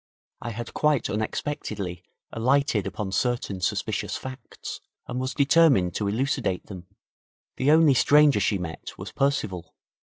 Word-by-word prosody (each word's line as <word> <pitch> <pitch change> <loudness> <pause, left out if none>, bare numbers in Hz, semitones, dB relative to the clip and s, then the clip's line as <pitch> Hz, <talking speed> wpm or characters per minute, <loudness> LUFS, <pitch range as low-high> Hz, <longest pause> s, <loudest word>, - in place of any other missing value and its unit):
I 120 - -4
had 115 +1 -6
quite 150 -3 +1
unexpectedly 105 - -3 0.3
alighted 125 -3 +1
upon 95 0 -4
certain 105 -3 -1
suspicious - - -1
facts, 130 +1 -8 0.2
and 125 +1 -4
was 130 +1 -3
determined 140 - +4
to 105 - -2
elucidate 120 -4 -1
them. 90 -3 -10 0.7
The 130 - +1
only 155 -2 +6
stranger 145 -1 +5
she 100 +1 +1
met 80 -4 -7
was - - -7
Percival. 135 -11 -1
120 Hz, 130 wpm, -25 LUFS, 95-140 Hz, 0.7 s, only